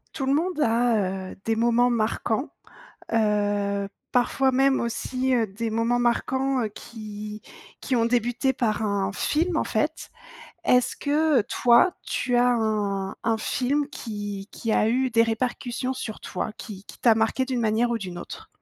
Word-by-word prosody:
Tout 270 -4 -2
le 270 - +3
monde 330 +2 0
a, 220 -6 +1
heu, - - -10
des 225 0 0
moments 235 +1 +3
marquants, 230 +2 0 0.6
heu, 205 -2 +1 0.2
parfois 260 +2 +2
même 270 +1 +3
aussi, 255 +2 -1
heu, 230 -3 +2
des 220 +4 -4
moments 230 +2 +1
marquants, 260 +2 +1
heu, - - 0
qui 210 -1 -8 0.4
qui 260 - -1
ont 230 - +3
débuté 245 +2 +1
par 225 -3 -1
un 200 -2 0
film, 330 - 0
en - - +2
fait, - - -2 0.5
est-ce 250 0 +3
que, 300 -2 +2
toi, 240 - +4 0.2
tu 245 -2 0
as 245 +1 +4
un 205 -4 -1
un 225 -1 +1
film 275 +6 0
qui 205 -5 -6
qui 230 - -3
a 215 - +3
eu 255 +3 +1
des 230 -1 +4
répercussions 245 +2 -2
sur 255 -4 -6
toi, 210 +3 -4
qui 205 -3 -9
qui - - -12
t'a 230 -2 +5
marqué 225 +4 +1
d'une 260 -2 -2
manière 225 +1 +2
ou 235 - 0
d'une 185 -5 -7
autre? 440 - -9
235 Hz, 165 wpm, -25 LUFS, 215-255 Hz, 0.6 s, t'a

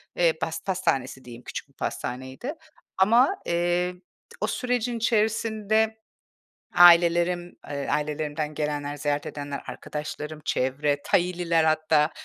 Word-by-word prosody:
Eee, 170 -2 +3
pas 160 0 -4
pastanesi 135 -9 -1
diyeyim, 120 0 -11
küçük - - -6
bir - - -28
pastaneydi. 130 - -5 0.4
Ama, 235 - +5
eee, 175 +1 0 0.5
o - - +1
sürecin 245 -1 -1
içerisinde 220 -1 +1 0.8
ailelerim, 175 0 +5
eee, 140 -1 -4
ailelerimden 150 0 -2
gelenler, 145 -1 -3
ziyaret 145 0 -1
edenler, 145 -1 -5
arkadaşlarım, 150 +1 -6
çevre, 145 +3 0
Thai'liler 175 -2 +2
hatta, 155 -1 +3
165 Hz, 110 wpm, -26 LUFS, 145-190 Hz, 0.8 s, Ama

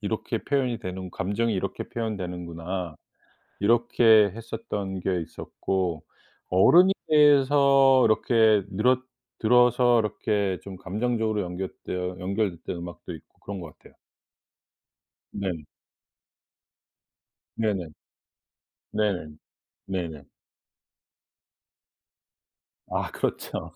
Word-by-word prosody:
이렇게 110 +2 -2
표현이 130 -4 0
되는 95 -3 -6
감정이 105 +6 -1
이렇게 95 +1 -4
표현되는구나.' 90 -6 -5 0.6
이렇게 110 -1 +4
했었던 105 -4 -5
게 90 -1 0
있었고 85 +1 -3 0.5
어른이 175 - +6 0.2
돼서 140 -3 +5
이렇게 110 -1 +3
늘었 125 +6 +2 0.4
들어서 125 +1 +4
이렇게 105 -3 -1
좀 100 -1 -8
감정적으로 110 +2 -1
연결되어 90 0 -5
연결됐던 95 -2 -2
음악도 85 0 -8
있고 80 - -18
그런 100 -1 -7
것 80 -4 -10
같아요. - - -20 1.4
네. 90 -6 -4 1.9
네네. 100 -6 -1 1.0
네. 105 -1 +1 0.7
네네. 85 -6 -4 2.7
아 - - -2
그렇죠. - - -4
100 Hz, 205 characters per minute, -26 LUFS, 90-115 Hz, 2.7 s, 어른이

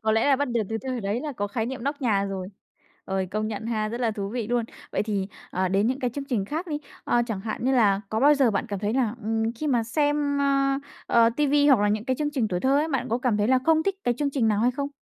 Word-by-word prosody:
Có 220 0 +2
lẽ 225 +5 +2
là 275 - +5
bắt 285 0 -1
được 235 -1 0
từ 225 - -2
thời 255 -2 -2
đấy 205 +4 -1
là 295 -1 -4
có 205 -4 -2
khái 225 +2 -2
niệm 255 0 -5
nóc 285 +1 -2
nhà 205 -5 +2
rồi. 190 -1 -4 0.6
Ôi, 190 -1 -2
công 215 +2 -1
nhận 220 0 -5
ha, 215 -2 -1
rất 235 +3 -5
là 230 -2 +2
thú 200 -2 -4
vị 230 -1 -3
luôn. 240 -1 +1 0.3
Vậy - - +1
thì, 205 -3 -2 0.2
ờ, 185 0 0
đến 195 +3 +2
những 260 +3 0
cái 250 -2 0
chương 280 +3 -5
trình 240 -8 -1
khác 315 - -4
đi, 300 -3 -2 0.3
ờ, 240 - +2
chẳng 210 -5 -3
hạn 220 +2 -4
như 265 - +2
là 205 -6 +4
có 220 +2 -1
bao 295 +2 +6
giờ 270 -4 +3
bạn 205 +4 -1
cảm 200 -2 -3
thấy 210 +2 -1
là, 240 -4 +1
ừm, 225 +1 0
khi 305 - -4
mà 245 -5 +2
xem, 290 +3 0
ơ, 275 -1 +2 0.3
ờ, 230 -1 +5
ti 295 -1 +2
vi 285 +1 +3
hoặc 260 -6 +6
là 205 - +3
những 210 +1 0
cái 260 - 0
chương 295 +1 -1
trình 255 -7 0
tuổi 180 -1 -2
thơ 270 +2 +3
ấy, 310 +2 0
bạn 270 -5 -1
có 235 +2 0
cảm 250 -4 +1
thấy 210 +2 +1
là 260 - +5
không 320 -1 +4
thích 395 +2 0
cái 245 - +2
chương 290 -1 0
trình 250 -5 +1
nào 210 0 +1
hay 245 +2 +3
không? 280 +2 -3
235 Hz, 305 wpm, -25 LUFS, 215-275 Hz, 0.6 s, bao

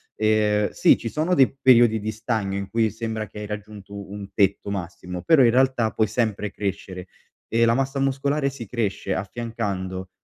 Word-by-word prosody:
ehm, 105 -1 +2
sì - - +4
ci 115 - -5
sono 155 +8 0
dei 135 -7 +4
periodi 120 -3 +5
di 110 +1 -3
stagno 110 -3 -2
in 100 0 -5
cui 115 -1 +1
sembra 110 0 -4
che 105 - -10
hai 105 - -5
raggiunto 100 -1 -8
un 100 -1 -8
tetto 100 -1 +1
massimo, 90 -2 -5
però 155 0 +5
in 120 - +5
realtà 130 -3 +2
puoi 110 - +1
sempre 105 -2 -1
crescere 95 -2 -5 0.4
e 115 +1 +2
la 115 0 +4
massa 135 +1 -1
muscolare 140 +1 0
si 130 -5 -8
cresce 100 -3 -2
affiancando, 95 -3 -4
110 Hz, 175 wpm, -23 LUFS, 100-120 Hz, 0.4 s, periodi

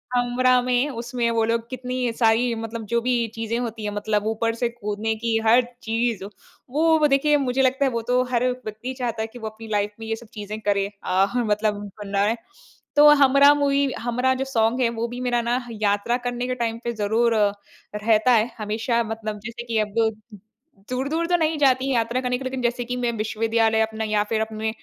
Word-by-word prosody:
हमराह 250 +1 +3
में 250 +3 +1
उसमें 240 -1 -2
वो 230 -1 +1
लोग 230 0 -1
कितनी 255 -1 -2
सारी 230 +1 +3
मतलब 225 0 -5
जो 235 +3 +1
भी 240 -1 +1
चीज़ें 225 +1 -2
होती 230 -2 -4
हैं, 210 - -2
मतलब 210 0 -1
ऊपर 225 +1 0
से 235 0 -1
कूदने 220 -1 -3
की 225 0 0
हर 235 +3 +6 0.2
चीज़, 225 -3 -1 0.5
वो 320 +4 +3
ब 300 - +4
देखिए 295 +2 +3
मुझे 265 -1 0
लगता 265 +1 +2
है 265 - +1
वो 230 -1 -2
तो 250 +2 +1
हर 240 -1 +1
व्यक्ति 250 0 -6
चाहता 235 -3 -2
है 220 - -2
कि 240 +2 -12
वो 220 - -5
अपनी 220 +1 -12
लाइफ 205 0 0
में 225 - -7
ये 225 - -1
सब 230 +1 -13
चीज़े 210 0 -6
करे 200 -2 0 0.2
अ, 185 +1 +3
ह 245 - +2
मतलब 210 -1 0 0.2
बनाए। 200 +2 +1 0.6
तो 295 +1 +8 0.2
हमराह 280 +2 +6
मूवी 280 -1 +1
हमराह 250 +2 +1
जो 265 +1 -2
सॉन्ग 235 -1 +1
है, 240 - +3
वो 230 0 -3
भी 245 +1 -7
मेरा 245 -1 +1
ना 240 +2 0
यात्रा 210 +2 0
करने 245 0 -3
के 255 - -1
टाइम 230 -2 -2
पे 235 - -2
ज़रूर 225 +2 +1
अ, 210 -2 +3 0.4
रहता 220 +3 +3
है। 225 0 +3
हमेशा 225 +2 -1
मतलब 220 -1 -5
जैसे 235 +1 -6
कि 230 -2 -2
अब 210 -1 -2 1.0
दूर-दूर 280 +7 -1
तो 350 - +3
नहीं 320 -1 0
जाती, 265 -1 +3
यात्रा 235 +1 0
करने 250 -1 -1
के 265 - -8
लिए 260 - -2
लेकिन 260 0 -4
जैसे 245 0 0
कि 250 +1 -3
मैं 240 -1 0
विश्वविद्यालय 225 +1 +1
अपने 220 0 -2
या 210 -1 +1
फिर 220 +1 -1
अपने 220 0 -2
235 Hz, 210 wpm, -23 LUFS, 220-250 Hz, 1.0 s, तो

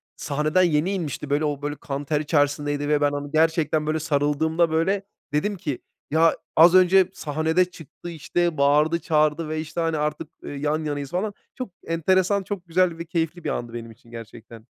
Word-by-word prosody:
sahneden 155 +5 +1
yeni 165 +2 +2
inmişti. 150 -5 -4
Böyle, 145 +2 +1
o 145 -1 -2
böyle 145 0 -3
kan 140 0 -5
ter 150 0 0
içerisindeydi 145 -1 0
ve 150 -1 +2
ben 145 0 +3
onu 145 0 -5
gerçekten 160 -1 +2
böyle 155 0 0
sarıldığımda, 160 +2 +1
böyle, 190 +5 +1 0.3
dedim 200 +7 0
ki: 145 -8 -4 0.3
"Ya, 165 +1 +4 0.2
az 170 +3 +7
önce 185 0 +6
sahnede 160 +4 +1
çıktı, 175 0 -11
işte, 170 0 -1
bağırdı 150 +4 +3
çağırdı 155 -1 +1
ve 155 0 -2
işte, 160 +2 -4
hani, 165 -1 0
artık, 150 +1 -2 0.2
ııı, 145 - -6
yan 150 +2 -1
yanayız, 145 -1 -4
falan." 200 +3 -2 0.2
Çok 255 -5 -5 0.2
enteresan, 185 +4 +2
çok 185 -3 -6
güzel 170 0 +2
ve 170 - -6
keyifli 165 0 -2
bir - - -2
andı 120 -1 -4
benim 115 -1 -7
için 115 +2 -19
gerçekten. 115 0 -11
155 Hz, 185 wpm, -24 LUFS, 145-170 Hz, 0.3 s, az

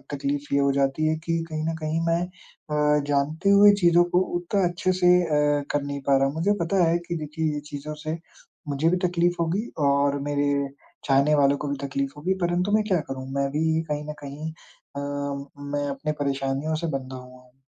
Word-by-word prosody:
तकलीफ 140 +1 -2
ये 140 - +4
हो 140 0 +3
जाती 140 +3 +1
है 155 - +2
कि 165 -1 0
कहीं 155 0 -3
न - - -4
कहीं 155 +1 -1
मैं 165 +1 +2
अ, 150 -4 -1
जानते 145 +6 +1
हुए 205 +1 +8
चीज़ों 175 0 +6
को - - +6 0.2
उतना 185 +3 0
अच्छे 185 +2 0
से 180 - +5 0.2
अ, 150 -2 +2
कर 145 - +1
नहीं 140 0 -4
पा 140 -1 +5
रहा 135 - +3
हूँ। 135 - -3
मुझे 180 +6 +2
पता 185 +2 +2
है 170 - +3
कि 170 - -2
देखिए, 155 0 -2
ये - - -2
चीज़ों 145 +1 -5
से 155 +1 -2 0.5
मुझे 145 +3 +1
भी 180 - +2
तकलीफ़ 175 0 +1
होगी 185 +8 -1 0.2
और 140 0 +2
मेरे 145 0 +1 0.6
चाहने 140 +2 +3
वालों 140 -1 +3
को 145 - -4
भी 140 - -1
तकलीफ़ 140 0 -2
होगी 175 +6 0
परंतु 175 +3 +1
मैं 215 +1 +3
क्या 185 -5 +2
करूँ? 130 -1 -5
मैं 140 0 0
भी 160 +2 +1
कहीं 150 0 -2
न - - -3
कहीं 145 +3 -6
अ, 140 -3 -13 0.6
मैं 145 0 -2
अपने 140 +2 -3
परेशानियों 140 +2 -1
से 165 +2 -2
बँधा 130 0 -9
हुआ 125 0 -13
हूँ। 125 +1 -26
150 Hz, 205 wpm, -25 LUFS, 140-170 Hz, 0.6 s, हुए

